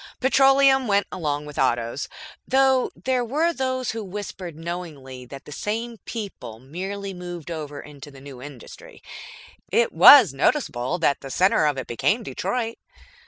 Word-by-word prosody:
Petroleum 270 0 +4
went 200 -1 +2
along 150 -4 -3
with 150 -1 -8
Autos. 120 +1 0 0.4
(Though 265 -1 +3
there 255 -1 -1
were 310 +8 0
those 260 -3 -2
who 225 -1 -5
whispered 190 -3 -7
knowingly 155 -7 -7
that 135 +2 -11
the - - -11
same 225 +8 -4
people 195 - -7
merely 190 - -6
moved 175 -2 -8
over 150 -3 -6
into 145 -1 -11
the 135 -1 -14
new 135 -2 -11
industry. 145 - -12 0.7
It 480 +1 +2
was 250 - +9
noticeable 135 - 0
that 150 -5 +1
the 135 - -8
center 180 +1 +3
of 145 -2 0
it 130 - -4
became 205 - 0
Detroit.) 230 +2 -3
180 Hz, 150 wpm, -23 LUFS, -, 0.7 s, was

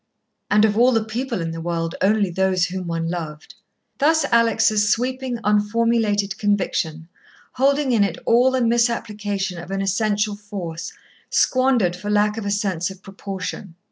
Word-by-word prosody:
And 210 +1 +5
of 210 -1 +1
all 245 +3 +5
the 225 -3 +1
people 230 -1 -3
in 165 0 -3
the 165 0 -6
world, 165 0 -2
only 200 -1 +2
those 185 0 +1
whom 180 0 -5
one 165 -1 -2
loved. 160 -3 -6 0.5
Thus 315 +1 +3
Alex' 230 -2 +3
sweeping, 255 +1 -1
unformulated 210 -1 +1
conviction, 180 -6 -1 0.4
holding 275 +1 +1
in 225 -4 +4
it 190 -4 -1
all 245 +3 +4
the 260 -1 0
misapplication 210 -5 -1
of 170 - -9
an 195 0 -2
essential 205 +1 0
force, 195 -5 -6 0.4
squandered 255 -9 +2
for 185 +3 -6
lack 210 0 +2
of 220 -3 -4
a - - 0
sense 195 -3 -1
of 190 0 -12
proportion. 195 -2 -7
205 Hz, 155 wpm, -21 LUFS, 185-230 Hz, 0.5 s, And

